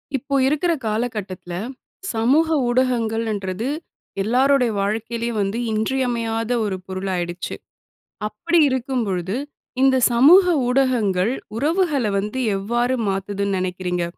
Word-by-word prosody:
இப்போ 275 +2 -2
இருக்கிற 305 +5 +1
காலகட்டத்தில, 210 -5 -3 0.6
சமூக 260 +9 +3 0.2
ஊடகங்களன்றது 225 -4 0 0.5
எல்லாருடைய 250 +2 +3
வாழ்க்கையிலேயும் 225 +2 -2
வந்து 200 +3 -1
இன்றியமையாத 230 0 -1
ஒரு 200 -2 -2
பொருளாயிடுச்சு. 185 -2 -3 0.7
அப்படி 335 +11 0
இருக்கும்பொழுது, 230 -8 -2 0.5
இந்த 265 -1 +5 0.2
சமூக 300 +11 +7 0.2
ஊடகங்கள் 240 -6 +2 0.2
உறவுகள 305 0 +1
வந்து 210 +6 -3 0.2
எவ்வாறு 240 +6 0
மாத்துதுன்னு 195 0 -1
நெனைக்கிறீங்க? 180 -1 -2
225 Hz, 90 wpm, -21 LUFS, 195-260 Hz, 0.7 s, சமூக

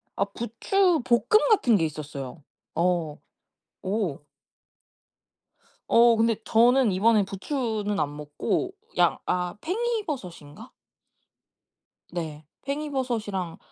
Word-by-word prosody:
아 200 - +1
부추볶음 245 - +2
같은 250 - +4
게 165 - +1
있었어요. 150 -2 -7 0.3
어 170 -3 0 0.7
오. 185 -8 -2 1.6
어 235 0 +6
근데 225 0 +2
저는 240 +1 +4
이번에 210 +3 +4
부추는 210 - -2
안 145 -1 -1
먹고 150 - -2 0.3
양 - - +4
아 180 -1 -1
팽이버섯인가? 290 - -4 1.4
네. 160 -3 -5 0.2
팽이버섯이랑 245 - -3
210 Hz, 190 characters per minute, -26 LUFS, 170-255 Hz, 1.6 s, 어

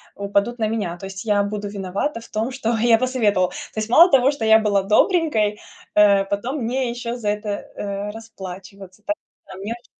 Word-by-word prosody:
упадут 200 +4 -1
на 220 -2 0
меня. 205 -6 -3
То 195 - -9
есть 190 -1 -7
я 205 -2 +2
буду 205 0 -4
виновата 200 +6 -3
в - - -15
том, 220 +3 -2
что 240 -3 -1
я 230 0 +4
посоветовала. 220 -7 +1
То - - -10 0.2
есть 215 0 -3
мало 335 +9 +7
того, 270 +1 +5
что 285 -6 -4
я 220 0 +7
была 210 -2 +2
добренькой, 215 - +2 0.3
э, 200 -1 +5
потом 235 +8 -3
мне 250 +2 -1
еще 235 0 -4
за 215 -4 -2
это, 210 +1 -2 0.3
э, 200 0 -4
расплачиваться 195 -3 -10
так, 310 - 0 0.3
а 185 - -10
мне 200 +4 -4
очень 240 - -27
215 Hz, 200 wpm, -21 LUFS, 200-235 Hz, 0.3 s, мало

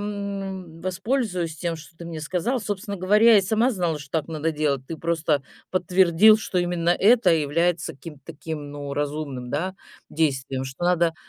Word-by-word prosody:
м, 195 -4 -5
воспользуюсь 185 - -2
тем, 165 +2 -3
что 160 0 -14
ты 170 - -9
мне 160 -2 -6
сказал. 185 - -1
Собственно 205 0 -4
говоря, 210 +5 +5
я 210 - +8
и - - +2
сама 220 +6 +2
знала, 175 -7 -1
что 145 -2 -12
так 150 - -6
надо 160 0 -1
делать. 150 -4 -1
Ты 165 - -5
просто 160 -3 0 0.3
подтвердил, 185 +3 +5
что 195 -4 -2
именно 175 -1 0
это 220 +3 +5
является 165 +2 +1
каким-то 150 0 -11
таким, 155 -2 -7
ну, 145 -1 -6
разумным, 145 -3 -3
да, 180 +8 -2 0.4
действием. 135 -4 -1
Что 135 +6 -6
надо, 170 -2 +2
170 Hz, 170 wpm, -24 LUFS, 150-190 Hz, 0.4 s, я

